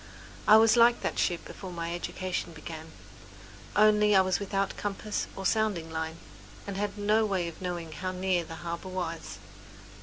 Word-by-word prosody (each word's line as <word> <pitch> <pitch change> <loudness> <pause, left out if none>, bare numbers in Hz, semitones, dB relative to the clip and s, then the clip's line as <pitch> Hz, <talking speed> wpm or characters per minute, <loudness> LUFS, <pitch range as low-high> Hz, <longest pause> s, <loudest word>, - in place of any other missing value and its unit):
I 215 - +9
was 220 0 +6
like 235 +1 +6
that - - -2
ship 175 -1 0
before 190 -2 -8
my 170 -1 -3
education 180 0 -3
began, 160 +1 -8 0.8
only 210 0 +5
I 190 - +8
was 185 -1 +1
without 195 -1 -1
compass 205 +1 -3
or 195 - -6
sounding 200 -7 +1
line, 160 0 -3 0.5
and 200 - -5
had 205 +1 -2
no 210 +2 +3
way 190 -5 0
of 170 - -9
knowing 175 -3 -4
how 185 +4 -4
near 185 -1 0
the 165 0 -8
harbour 170 +2 -4
was. 175 -3 -4
185 Hz, 170 wpm, -29 LUFS, 170-205 Hz, 0.8 s, I